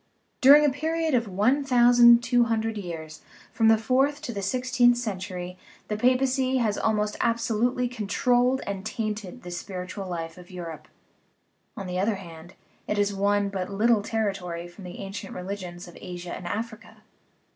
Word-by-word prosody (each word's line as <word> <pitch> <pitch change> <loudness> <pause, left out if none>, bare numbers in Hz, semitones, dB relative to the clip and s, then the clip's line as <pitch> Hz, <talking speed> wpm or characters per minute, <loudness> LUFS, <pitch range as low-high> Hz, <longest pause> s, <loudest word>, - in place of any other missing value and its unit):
During 290 +2 +8
a 290 - +3
period 320 +2 -1
of 235 -3 +2
one 215 +9 +2
thousand 240 -2 +6
two 245 0 +3
hundred 225 -1 -1
years, 165 -6 -7 0.3
from 225 - +3
the 225 0 +6
fourth 265 +6 +1
to 240 - -4
the 200 - -4
sixteenth 245 +3 +2
cen 215 -6 -3
tury, 180 -1 -6 0.3
the 210 - -1
papacy 255 +3 +2
has 220 -4 +1
almost 210 -1 0
absolutely 235 +2 +1
controlled 245 +3 +1
and 195 -1 -4
tainted 215 0 -4
the 175 - -8
spiritual 185 +2 -6
life 165 -1 -5
of 175 - -14
Europe; 165 -4 -8 0.9
on 195 - -5
the 180 0 -3
other 205 +3 +1
hand, 170 -2 -11 0.3
it 210 - -1
has 205 0 +1
won 200 0 +1
but 190 -2 -4
little 215 +2 +2
territory 195 -6 -3
from 180 +2 -13
the 180 - -8
ancient 195 0 -7
religions 180 -2 -6
of 175 - -13
Asia 175 -1 -6
and 175 - -7
Africa. 225 +2 -6
210 Hz, 165 wpm, -26 LUFS, 185-245 Hz, 0.9 s, During